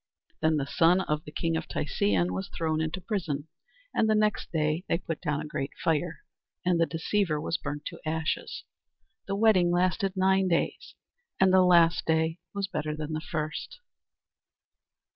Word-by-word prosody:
Then 155 0 +3
the 140 - -1
son 170 +5 +4
of 150 -4 -2
the 150 - -9
king 165 +2 -1
of 160 - -3
Tisean 100 - 0
was 95 +1 -4
thrown 160 -1 -1
into 160 +3 -2
prison, 165 -8 -3 0.5
and 220 - +2
the 215 - +4
next 210 0 +1
day 155 +1 0
they - - +3
put 165 -2 -5
down 150 -1 -1
a - - -6
great 140 -2 -3
fire, 165 +1 0 0.4
and 175 -2 +3
the 165 - +3
deceiver 165 -1 0
was 165 +3 -2
burnt 145 0 -5
to - - -7
ashes. 160 0 -2 0.6
The 195 - -1
wedding 200 -5 +4
lasted 185 +2 +1
nine 190 0 +3
days, 170 -2 -1 0.4
and 190 -1 +5
the 190 - +7
last 175 -1 +4
day 160 +1 +1
was 200 -1 -2
better 155 -5 -3
than 155 0 -5
the 155 - -2
first. 155 - -4
165 Hz, 170 wpm, -28 LUFS, 155-185 Hz, 0.6 s, the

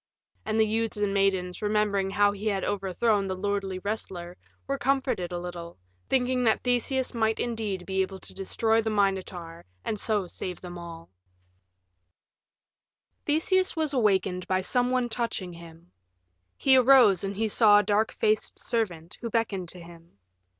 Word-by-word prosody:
And 220 0 0
the 220 - +5
youths 225 0 -1
and 205 -1 0
maidens, 190 -2 0
remembering 210 -2 +1
how 205 +1 +3
he 205 +2 -5
had 195 -3 0
overthrown 200 +1 0
the 190 - -2
lordly 195 0 -2
wrestler, 185 -3 -5 0.3
were 275 0 -2
comforted 260 -9 0
a 175 - -3
little, 175 -1 -7 0.3
thinking 255 -1 +1
that 220 - +2
Theseus 250 +1 0
might 220 -1 0
indeed 215 -6 -3
be 190 0 0
able 190 0 -3
to - - -9
destroy 220 +4 +1
the 220 - -2
Minotaur 190 -5 -2 0.2
and 215 - -2
so 210 -3 0
save 180 +1 -6
all - - -6
of - - -8
them. 170 -1 -9 2.1
IV - - -49
Theseus 370 +5 +2
was 310 -3 0
awakened 190 -6 +1
by 185 0 +1
some 245 +5 0
one 255 -1 +1
touching 225 -6 -3
him. 170 +1 -14 0.7
He 265 -1 +5
arose 250 -7 +6
and 195 0 -3
he 220 +2 0
saw 210 -1 +5
a 205 - +4
dark 210 +2 +1
faced 215 0 +1
servant, 175 -8 -2
who 235 - -3
beckoned 205 -6 -1
to 180 - -7
him. 170 -6 -15
205 Hz, 165 wpm, -27 LUFS, 185-230 Hz, 2.1 s, arose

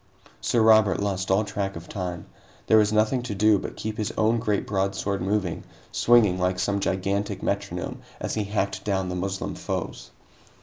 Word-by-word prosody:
Sir 115 -2 +2
Robert 110 -2 +5
lost 95 -2 -2
all 95 +3 +3
track 100 -1 -3
of 85 +1 -8
time. 90 -4 -5 0.4
There 110 - +6
was 105 0 +3
nothing 110 +4 +2
to 120 -4 -5
do 105 0 +4
but - - -6
keep 110 +1 -4
his 110 +1 -1
own 110 +2 +3
great 105 -3 0
broadsword 100 0 -1
moving, 95 -2 -1 0.3
swinging 110 -6 +4
like 90 0 +1
some 100 +2 0
gigantic 100 +1 -1
metronome 100 -3 -3 0.2
as - - -3
he 105 -2 -1
hacked 100 -1 -2
down 95 -3 -1
the 90 - -3
Moslem 95 +1 -3
foes. - - -5
100 Hz, 175 wpm, -25 LUFS, 95-110 Hz, 0.4 s, There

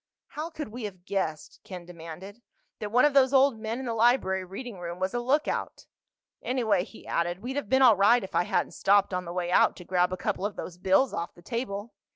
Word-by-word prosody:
"How 310 +2 -5
could 305 -6 -6
we 230 +1 -6
have 185 -3 -9
guessed," 175 -6 -3
Ken 180 -2 -9
demanded, 175 +5 -10 0.4
"that 210 -1 -5
one 245 +5 +5
of 295 - +3
those 270 -1 +4
old 265 -3 +4
men 220 +1 -3
in 265 - -5
the 235 - -2
library 225 -5 +2
reading 195 +3 -8
room 175 0 -6
was 185 +1 -1
a 240 - 0
lookout? 270 +5 -1 0.6
Anyway," 220 -7 +1
he 220 - -14
added, 175 +3 -2
"we'd 260 +2 -4
have 285 -8 -3
been 265 0 +4
all 235 -4 +8
right 205 +4 +4
if 190 - -8
I 175 - +2
hadn't - - 0
stopped 200 -1 +2
on 180 0 -2
the 170 - -6
way 175 0 -2
out - - +4
to 180 - -11
grab 180 0 +1
a 185 - -3
couple 195 +1 -2
of 205 0 -2
those 175 -1 -7
bills 190 +9 +3
off 170 - -4
the 175 - -17
table. 230 -1 -4
205 Hz, 230 wpm, -27 LUFS, 180-245 Hz, 0.6 s, all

